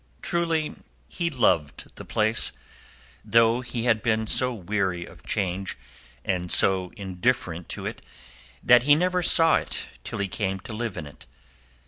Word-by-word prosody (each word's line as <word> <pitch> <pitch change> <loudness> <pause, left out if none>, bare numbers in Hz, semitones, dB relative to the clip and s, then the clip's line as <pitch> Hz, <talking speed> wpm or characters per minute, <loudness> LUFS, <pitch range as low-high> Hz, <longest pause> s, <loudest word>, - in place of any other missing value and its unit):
Truly 165 -3 0 0.3
he 170 -2 -2
loved 90 - 0
the - - -9
place, 110 +1 +1 0.7
though 115 +1 +3
he 120 -2 -4
had 115 -3 +2
been 110 -1 +1
so 125 +3 +2
weary 95 -4 -2
of - - -15
change 95 0 -2 0.5
and 90 -2 -1
so 95 -2 +2
indifferent 90 -3 -2
to - - -6
it - - -5 0.6
that 120 -1 +7
he 145 +3 +5
never 180 +3 +1
saw 165 -2 +5
it - - -4 0.2
till - - -6
he 100 - -1
came 95 0 -2
to 110 - -8
live 110 -3 -4
in 80 - -5
it. 75 - -14
110 Hz, 150 wpm, -25 LUFS, 95-125 Hz, 0.7 s, that